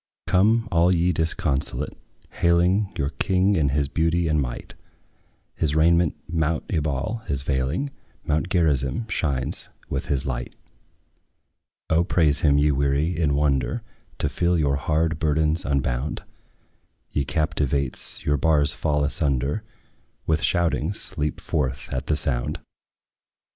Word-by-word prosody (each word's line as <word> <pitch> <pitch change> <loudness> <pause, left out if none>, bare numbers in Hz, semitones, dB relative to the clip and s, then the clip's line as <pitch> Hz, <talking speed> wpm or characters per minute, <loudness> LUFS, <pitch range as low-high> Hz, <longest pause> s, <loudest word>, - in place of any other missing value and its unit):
Come, 110 +5 +3
all 85 +2 +4
ye 90 0 +2
disconsolate, 75 -4 -1 0.4
hailing 90 +4 +2
Your 70 +1 -1
King 95 +1 +2
in 75 -5 +2
his 70 +1 +1
beauty 80 +3 +1
and 75 -1 +2
might; - - -5 0.8
His 75 -1 -1
raiment 85 0 +3
mount 80 -1 0
Ebal 75 - -1
is 70 -2 -1
veiling; 70 - -1 0.3
Mount 80 +3 0
Gerizim 80 - +1
shines 70 -9 0 0.2
with - - -2
his 70 -2 0
light. 60 -2 -4 1.4
O 80 +2 +4
praise 80 -4 +2
him, 70 -2 +3
ye 75 +1 +3
weary, 70 +4 +1
in 80 -4 +1
wonder 70 - 0 0.3
To - - +4
feel 85 0 +1
your 70 -3 +1
hard 80 +2 0
burdens 80 +1 +1
unbound! 70 0 -1 0.9
Ye 70 - 0
captives, 70 -3 -1
your 75 0 +2
bars 75 -1 +3
fall 75 -2 0
asunder; 70 - 0 0.6
With 80 -2 +1
shoutings 85 +3 0
leap 75 -3 -2
forth 70 -2 -2
at 65 - -3
the - - +2
sound. - - -1
75 Hz, 125 wpm, -24 LUFS, 70-85 Hz, 1.4 s, all